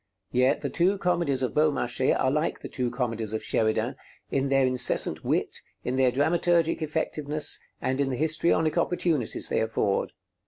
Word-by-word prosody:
Yet 125 +1 +2
the - - -2
two 185 +3 +2
comedies 170 -8 0
of 125 - -1
Beaumarchais 140 -5 +1
are 130 - +2
like 150 +3 -1
the - - -6
two 125 -2 -2
comedies 115 -3 -3
of 110 - -3
Sheridan 110 -1 0 0.3
in 135 0 0
their 135 -1 +3
incessant 125 -1 +2
wit, - - -1 0.3
in 125 - -2
their 130 -1 +3
dramaturgic 165 +5 +1
effectiveness, 150 -1 +1 0.2
and 130 +2 -1
in 135 - 0
the 130 - -3
histrionic 155 +1 +1
opportunities 165 -8 -1
they - - +1
afford. 110 -3 -1
135 Hz, 160 wpm, -26 LUFS, 125-160 Hz, 0.3 s, their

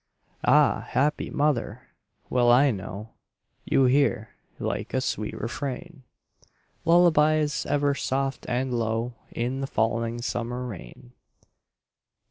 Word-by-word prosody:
Ah, - - +4
happy 145 +4 0
mother! 125 -5 0 0.4
Well 120 -1 +3
I 135 +3 +5
know 100 +1 -6 0.6
You 135 - +3
hear, 125 -4 +2 0.3
like - - -3
a - - +3
sweet - - -3
refrain, 140 +6 -5 0.8
Lullabies 155 -3 +4
ever 145 0 +2
soft 135 0 -2
and 125 +1 -1
low 115 +1 -1 0.2
In 125 +3 -2
the 135 - -2
falling 115 0 0
summer 120 +1 -3
rain. 70 - -10
125 Hz, 105 wpm, -26 LUFS, 115-145 Hz, 0.8 s, I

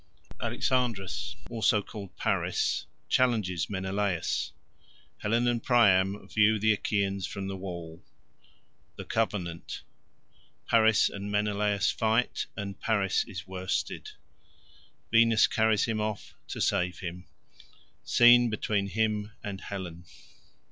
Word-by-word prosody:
Alexandria, 120 -7 0 0.4
also 115 -1 +3
called 100 -3 -9
Paris, - - 0 0.2
challenges 110 -9 +1
Menelaus—Helen 100 +4 -3
and 120 -1 +1
Priam 100 -5 +3
view 110 0 +3
the 110 +1 +3
Achaeans 100 -2 -1
from 100 -1 -5
the 95 - -4
wall—The 85 -3 -12
covenant—Paris 110 +3 -1
and 100 +1 -6
Menelaus 105 -1 +1
fight, 115 +2 0
and 100 -2 -5
Paris 100 -4 +1
is 95 -4 -7
worsted—Venus 95 +3 -1
carries 110 -1 +2
him 110 -2 -1
off 105 -1 -4
to - - -6
save 90 0 +1
him—Scene 90 +5 +1
between 105 -2 -1
him 105 0 -1
and 100 -2 -5
Helen. 90 -3 -7
100 Hz, 95 wpm, -29 LUFS, 95-110 Hz, 0.4 s, also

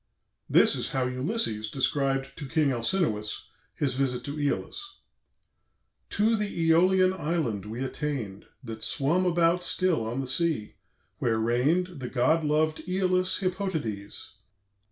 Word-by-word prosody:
This - - +5
is - - -1
how 130 -1 0
Ulysses 125 - -1
described 135 +1 -1
to 145 - -6
King 155 -2 +2
Alcinous 115 - -1 0.3
his 140 -4 0
visit 130 -1 -1
to 140 - -5
Æolus: 145 - -2 1.3
"To 220 +3 +2
the 185 -6 0
Æolian 185 +2 +4
island 135 - -2
we 115 +4 -4
attain'd, 130 -8 -4 0.2
That 110 -2 -7
swum 165 +9 +1
about 170 0 +2
still 180 -7 +3
on 115 +4 -3
the 135 - -3
sea, 150 -6 0 0.5
where 115 -2 +1
reign'd 140 +10 +1
The 125 -2 -5
God 135 +6 +2
lov'd 155 +1 +1
Æolus 185 0 +1
Hippotades. 160 - -4
145 Hz, 130 wpm, -27 LUFS, 125-180 Hz, 1.3 s, This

